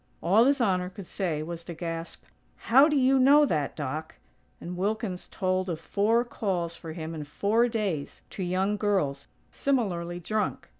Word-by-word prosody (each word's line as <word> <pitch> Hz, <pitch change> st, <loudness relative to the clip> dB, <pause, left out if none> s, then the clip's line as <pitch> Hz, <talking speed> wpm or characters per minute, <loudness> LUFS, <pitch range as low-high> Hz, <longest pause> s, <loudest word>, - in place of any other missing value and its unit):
All 200 Hz, +8 st, +5 dB
His 280 Hz, +1 st, +3 dB
Honor 185 Hz, -6 st, +1 dB
could 190 Hz, 0 st, -10 dB
say 165 Hz, -5 st, -2 dB
was 170 Hz, +1 st, -6 dB
to 170 Hz, -, -7 dB
gasp: 165 Hz, 0 st, -6 dB, 0.3 s
"How 270 Hz, +5 st, +5 dB
do 300 Hz, -, +1 dB
you 265 Hz, 0 st, +4 dB
know 285 Hz, +3 st, +6 dB
that, 150 Hz, -, -1 dB
Doc?" 150 Hz, +2 st, -5 dB, 0.4 s
and 180 Hz, +1 st, -6 dB
Wilkins 195 Hz, 0 st, -2 dB
told 185 Hz, 0 st, -1 dB
of 165 Hz, -2 st, -3 dB
four 220 Hz, +7 st, +1 dB
calls 180 Hz, -8 st, -2 dB
for 165 Hz, -2 st, -8 dB
him 160 Hz, 0 st, -6 dB
in 155 Hz, -2 st, -5 dB
four 205 Hz, +11 st, +1 dB
days, 200 Hz, -11 st, -3 dB
to -, -, -6 dB
young 190 Hz, +3 st, 0 dB
girls, 185 Hz, -10 st, 0 dB, 0.2 s
similarly 175 Hz, -10 st, -1 dB
drunk. 215 Hz, +5 st, -2 dB
185 Hz, 165 wpm, -27 LUFS, 165-220 Hz, 0.4 s, know